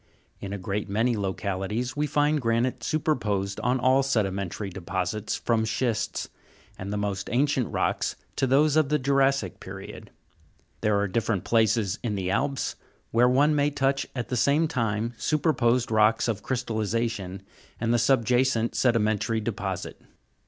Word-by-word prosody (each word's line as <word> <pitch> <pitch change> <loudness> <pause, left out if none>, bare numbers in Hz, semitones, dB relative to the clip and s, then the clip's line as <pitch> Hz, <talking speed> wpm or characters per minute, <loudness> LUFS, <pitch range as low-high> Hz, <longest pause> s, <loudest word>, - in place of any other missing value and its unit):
In 100 - -6
a 100 - -3
great 100 +2 -3
many 115 +4 +1
localities, 100 +4 -2
we 150 +1 0
find 150 +1 +2
granite 115 +1 0
superposed 105 -11 -1
on 125 +2 +1
all 130 +2 +4
sedimentary 100 -6 -1
deposits 95 +3 -3
from 115 -2 0
schists, 110 0 -1 0.5
and 95 +1 -6
the 105 - -1
most 100 -1 -3
ancient 135 0 +1
rocks, - - 0 0.2
to 135 - +2
those 145 +3 +4
of 155 -3 +3
the 150 - +3
jura'ssic 135 - +1
period. - - -9 0.7
There 105 -1 +2
are 100 - +1
different 105 -1 -1
places 110 -3 +2
in 110 -4 -2
the 95 -1 -2
Alps, 135 +6 -1 0.4
where 120 +2 +4
one 145 +4 +4
may 145 0 +3
touch 140 -1 0
at 125 -3 -4
the 125 - -1
same 145 +7 +3
time, 115 -3 -1
superposed 125 -6 +1
rocks 110 +1 +3
of 110 -4 -1
crystallization 110 -5 -2 0.4
and 115 +1 +1
the 120 - +3
subjacent 120 -1 +2
sedimentary 110 -2 +1
deposit. 95 -4 -4
115 Hz, 145 wpm, -26 LUFS, 105-130 Hz, 0.7 s, all